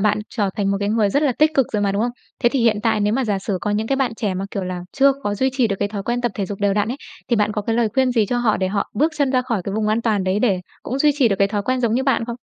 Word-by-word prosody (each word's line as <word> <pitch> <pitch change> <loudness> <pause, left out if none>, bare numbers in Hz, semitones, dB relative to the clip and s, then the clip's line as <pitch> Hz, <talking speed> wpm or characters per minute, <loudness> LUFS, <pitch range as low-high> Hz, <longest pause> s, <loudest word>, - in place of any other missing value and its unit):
bạn 210 +1 +2
trở 205 -5 -1
thành 200 -1 0
một 200 - +1
cái 200 - 0
người 215 -1 +2
rất 285 - +1
là 285 -4 +2
tích 310 +1 +4
cực 270 -5 +3
rồi 210 -2 0
mà, 200 -1 +1
đúng 200 +2 0
không? 240 - 0 0.3
Thế 240 - +6
thì 265 +1 -1
hiện 230 -2 +3
tại 220 -1 +1
nếu 205 +1 +1
mà 260 +3 +1
giả 205 -3 0
sử 195 -1 -3
có 210 - -2
những 210 +2 0
cái 270 - 0
bạn 265 -4 0
trẻ 210 -4 -2
mà, 190 +1 -3
kiểu 195 - -3
là, 180 -1 -4
chưa 275 0 +4
có 205 -5 -1
duy 260 +6 +1
trì 255 -2 +2
được 200 - -1
cái 205 - 0
thói 200 -1 -5
quen 240 +3 -1
tập 240 -3 -1
thể 200 - -2
dục 200 +1 -6
đều 200 -1 +2
đặn 210 +1 +1
ấy, 250 - -3 0.3
thì 235 - +3
bạn 210 0 +1
có 210 - -2
cái 225 +2 -1
lời 235 -2 +2
khuyên 260 -2 +2
gì 225 -4 +2
cho 245 +4 -1
họ 230 -3 +2
để 185 - -1
họ 200 +1 -2
bước 310 +9 +2
chân 285 -3 +1
ra 255 -1 +2
khỏi 230 -6 -2
cái 200 - -3
vùng 215 0 0
an 220 +2 +1
toàn 210 -5 +1
đấy 190 +2 +1
để 205 -5 +1 0.2
cũng 260 - -3
duy 300 +2 +4
trì 255 -5 +5
được 195 - 0
cái 195 - +3
thói 205 0 -2
quen 255 +4 -1
giống 230 -2 +1
như 255 - +1
bạn 265 -4 +1
không? 235 0 -5
220 Hz, 365 wpm, -21 LUFS, 205-250 Hz, 0.3 s, Thế